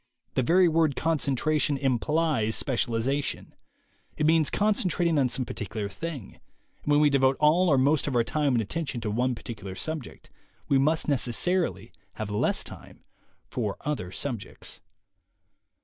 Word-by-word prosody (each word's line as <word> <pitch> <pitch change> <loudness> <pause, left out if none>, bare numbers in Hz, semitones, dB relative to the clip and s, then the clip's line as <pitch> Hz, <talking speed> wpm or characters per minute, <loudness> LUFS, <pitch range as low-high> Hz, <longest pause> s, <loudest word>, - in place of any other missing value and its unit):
The - - +1
very 175 +8 +4
word 160 -3 +2
concentration 150 -1 0
implies 135 -2 0
specialization; 130 +2 -1 0.6
it 150 - 0
means 160 -1 +4
con 210 +1 +2
centrating 170 -5 +1
on 130 -2 +2
some 130 +1 -1
particular 105 -1 -5
thing, 145 - -7 0.4
and 150 - -2
when 145 - +5
we 150 -1 +4
devote 135 -1 +3
all 165 +4 +4
or 140 - +4
most 140 +3 +2
of 135 - -2
our 120 - +4
time 145 +2 0
and 115 - +1
attention 140 +2 -4
to 105 - -2
one 125 +3 0
particular 105 -5 -8
subject, 155 +1 -6 0.4
we 135 - +3
must 155 +4 +2
necessarily 135 - +1 0.2
have 105 -1 -5
less 105 - +1
time - - -12 0.5
for 110 -5 -3
other 135 -12 -3
subjects. 110 -1 -6
140 Hz, 150 wpm, -27 LUFS, 120-155 Hz, 0.6 s, when